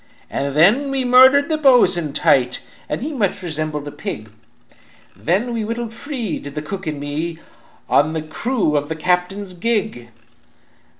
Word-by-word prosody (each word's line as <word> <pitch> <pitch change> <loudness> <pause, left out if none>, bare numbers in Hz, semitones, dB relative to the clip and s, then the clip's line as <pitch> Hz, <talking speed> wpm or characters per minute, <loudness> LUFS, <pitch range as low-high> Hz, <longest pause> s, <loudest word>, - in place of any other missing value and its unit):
"And 140 0 -2
then 215 - +4
we 270 -1 0
murdered 260 +3 +6
the 315 -1 -1
bo'sun 185 - +4
tight, 125 -3 +2 0.3
And - - -3
he 305 +2 -4
much 205 -8 -1
resembled 150 -3 -4
pig, 110 -6 -6 0.8
Then 205 - -1
we 230 -2 -2
wittled 230 +1 -4
free, 245 - -4
did 145 0 -9
the 150 - -3
cook 190 +3 -6
and 150 -2 -3
me, 155 +4 -3 0.5
On 155 +2 +3
the 160 -1 -3
crew 175 +2 -1
of 145 +1 -1
the 160 - -2
captain's 180 +4 -1
gig. 205 - -2
180 Hz, 155 wpm, -19 LUFS, 150-240 Hz, 0.8 s, murdered